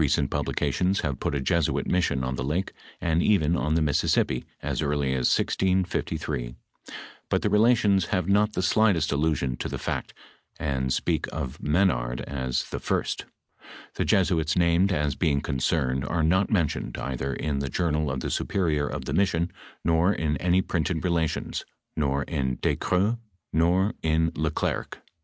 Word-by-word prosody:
Reoent 75 - +1
publications 95 +2 0
hav 70 -4 -2
put 75 - -1
a - - 0
Jesuit 80 +4 0
tuission 80 -7 +1
on 65 - -2
the 65 - -3
lake, 80 +8 -1 0.3
and 85 0 +1
even 85 -6 +3
on 80 -2 0
the 80 - +3
Mississippi, 70 -3 +1
as - - -2
early 70 -2 0
as 65 -2 +1
1663; 80 -9 0 0.7
but - - +1
the - - +2
iiela 115 +4 +5
tions 100 -4 +2
have 90 -4 0
not 105 +2 +3
the - - -1
sligljtest 95 -7 +3
allusion 70 -3 0
to - - -4
the - - -4
fntt, - - -3 0.5
and 65 -1 -1
speak - - 0
of 70 -2 -5
M£nard 70 -7 +1
as 65 -3 -2
the - - -3
first - - -1 0.7
Hie - - 0
Jesuits 85 -4 +2
named 85 +2 +3
as 75 -5 +1
being 70 0 +1
concerned, 65 -2 0
are 80 +3 -1
not 95 +5 +3
mentioned 85 -8 0
either 70 0 -3
in 70 0 -2
the 70 -1 -2
journal 75 0 0
of 65 0 -3
tlie - - -3
superior 80 -7 0
of - - -5
the - - -3
mission, 85 -3 +1 0.3
nor 85 +3 +3
in 80 -6 0
any 90 +1 +2
printed 85 -1 -1
Relations, 85 -3 -1 0.3
nor 70 -1 0
in 65 -6 -2
Ducreux, 105 +6 +1 0.3
nor 90 +5 +3
in 80 0 +2
Le 80 +1 0
Clercq. 75 - -2
80 Hz, 165 wpm, -26 LUFS, 70-90 Hz, 0.7 s, iiela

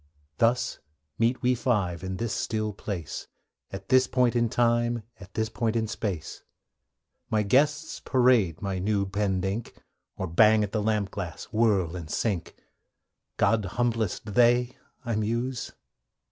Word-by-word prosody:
Thus 120 +2 +2 0.4
meet 120 +2 +1
we 125 +1 +4
five, 105 -8 0
in 95 0 -4
this 115 +1 -2
still 110 0 -2
place, 95 -5 -5 0.4
At 95 +1 -8
this 130 -1 +5
point 125 -2 +2
of 120 -1 +2
time, 120 0 +1 0.2
at 95 -1 -13
this 110 0 0
point 110 0 -1
in 115 -1 +1
space. 100 -7 -4 0.9
My 110 -3 +2
guests 145 +8 +2
parade 120 - +2
my 95 -2 -2
new 100 +1 +1
penned 95 -1 -1
ink, 100 +4 -3 0.4
Or 95 - -2
bang 105 +5 +5
at 100 - -3
the 105 - 0
lamp 105 -2 0
glass, 90 -5 -5
whirl, 100 -7 +2
and 85 -4 -7
sink. 95 -1 -2 0.8
'God's 110 -4 +2
humblest, 115 -4 -1
they!' 120 +2 +4 0.3
I 115 -2 -1
muse. 115 +3 -2
110 Hz, 145 wpm, -27 LUFS, 95-120 Hz, 0.9 s, this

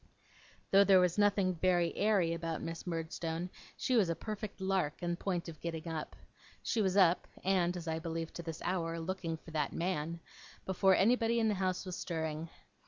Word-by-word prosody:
Though 195 +1 +8
there 195 -2 +6
was 180 +1 +2
nothing 200 -2 +3
very 175 0 +2
airy 200 -6 +2
about 165 -1 -3
Miss 165 +2 -6
Murdstone, 165 +1 -3 0.3
she 255 - +1
was 205 -7 +4
a 165 - 0
perfect 215 0 -6
Lark 190 -5 -1
in 175 0 0
point 180 -1 -2
of 160 -2 -9
getting 165 -1 -4
up. 160 -2 -4 0.5
She 225 - +1
was 190 -1 +1
up 180 -3 +4 0.2
(and, 180 -2 +2
as 170 -1 -7
I 160 0 -1
believe 165 0 -4
to - - -5
this 165 -1 -6
hour, 165 -2 -1
looking 165 -1 -3
for 160 - -13
that 150 -3 -1
man) 170 -2 -2 0.5
before 190 0 +4
anybody 235 +3 +3
in 220 -1 +3
the - - +2
house 185 -1 -1
was 185 -1 -5
stirring. 160 -1 -3
175 Hz, 185 wpm, -33 LUFS, 165-190 Hz, 0.5 s, Though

